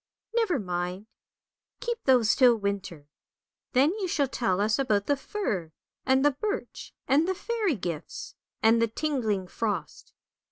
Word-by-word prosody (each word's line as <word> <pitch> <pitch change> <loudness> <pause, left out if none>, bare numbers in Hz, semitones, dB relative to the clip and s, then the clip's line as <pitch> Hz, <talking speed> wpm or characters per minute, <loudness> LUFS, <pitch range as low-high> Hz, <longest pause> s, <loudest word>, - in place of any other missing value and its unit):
" - - -62
Never 445 -9 +2
mind, 180 -1 -3 0.7
keep 475 -2 -4
those 245 -5 +5
till 250 -3 +6
winter. 195 -8 -4 0.7
Then 275 +5 +4
you 380 - -1
shall 290 -5 +1
tell 195 -7 0
us 210 +4 +2
about 210 -7 +1
the 285 - +2
fir, 215 - -3 0.3
and 265 +1 +4
the 290 - +6
birch, 415 +10 -4 0.2
and 295 +5 +3
the 375 - 0
fairy 420 - -1
gifts, 170 -6 -5 0.3
and 225 +1 +5
the 230 - +3
tingling 225 -7 -1
frost. 190 -6 -4
240 Hz, 150 wpm, -27 LUFS, 200-300 Hz, 0.7 s, till